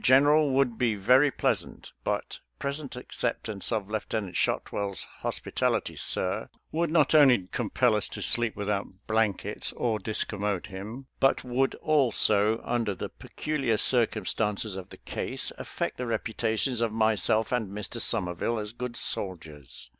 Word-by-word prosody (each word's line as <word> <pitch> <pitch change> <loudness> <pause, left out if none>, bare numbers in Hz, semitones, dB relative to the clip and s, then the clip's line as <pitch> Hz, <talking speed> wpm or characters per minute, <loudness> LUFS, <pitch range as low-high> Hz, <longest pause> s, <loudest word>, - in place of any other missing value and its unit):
General, 145 +3 +5
would 130 -3 +1
be 115 -3 +2
very 125 +9 +5
pleasant, - - -2
but - - -2 0.2
present 140 -1 -3
acceptance 115 -4 -2
of 105 -4 -1
Lieutenant 105 -2 -3
Shotwell's 100 -2 -1 0.2
hospitality, - - -1
sir, - - -1 0.2
would 165 +1 0
not 155 -1 +3
only 135 -10 +6
com - - -2
pel - - +3
us - - -1
to - - -5
sleep 120 -2 +1
without 100 -2 -3
blankets 110 -3 0
or 115 -3 -1
discommode 105 -3 -1
him, 105 +8 -8
but 135 - +3
would, 130 +2 0
also, 115 -7 +3
under 115 -4 -1
the - - -5
peculiar! 135 -8 -2
cir 120 -1 +5
cumstances 105 0 -1
of 95 -1 -7
the - - -12
case, - - -3
affect - - -4
the 125 - -3
reputations 115 +2 0
of 115 -2 +1
myself 110 0 +2
and 120 -5 0
Mr. 105 +3 -3
Somerville 105 +1 +1
as 105 -1 -4
good 120 0 -5
soldiers. 80 -9 -4
110 Hz, 145 wpm, -28 LUFS, 105-125 Hz, 0.2 s, only